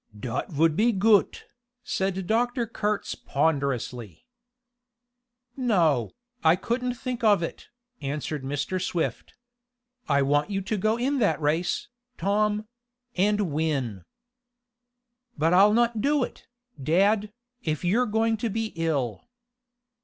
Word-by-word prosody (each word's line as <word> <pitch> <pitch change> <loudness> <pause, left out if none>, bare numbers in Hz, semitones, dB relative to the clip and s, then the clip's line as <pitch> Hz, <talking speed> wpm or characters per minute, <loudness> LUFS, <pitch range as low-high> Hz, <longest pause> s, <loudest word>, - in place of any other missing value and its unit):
"Dot 115 +1 -3
vould 160 0 +2
he 235 +2 +4
goot," 205 0 +3 0.4
said 190 -1 -2
Dr. 240 +3 +1
Kurtz 210 -2 -2
ponderously. 140 - -2 1.3
"No, 170 - +2 0.3
I 160 +1 +6
couldn't 245 +6 -2
think 250 0 -5
of 205 -5 +4
it," 165 - -6 0.3
answered 145 +1 -3
Mr. 145 +7 -2
Swift. 175 -2 -3 0.7
"I 140 -1 +3
want 145 +5 +1
you 195 -1 -1
to 195 +3 -2
go 215 +3 +1
in 270 +3 0
that 205 -6 +2
race, 160 +4 0 0.3
Tom 210 +3 0 0.5
and 205 -1 +1
win!" 135 - -1 1.3
"But 160 +3 +2
I'll 200 +3 +7
not 235 0 +2
do 290 +1 +2
it, - - -8 0.3
dad, 200 +8 +2 0.3
if 155 - -2
you're 230 +8 +2
going 225 +1 +1
to 225 +2 -2
be 225 +1 -3
ill." 145 -9 -2
190 Hz, 120 wpm, -26 LUFS, 150-220 Hz, 1.3 s, I'll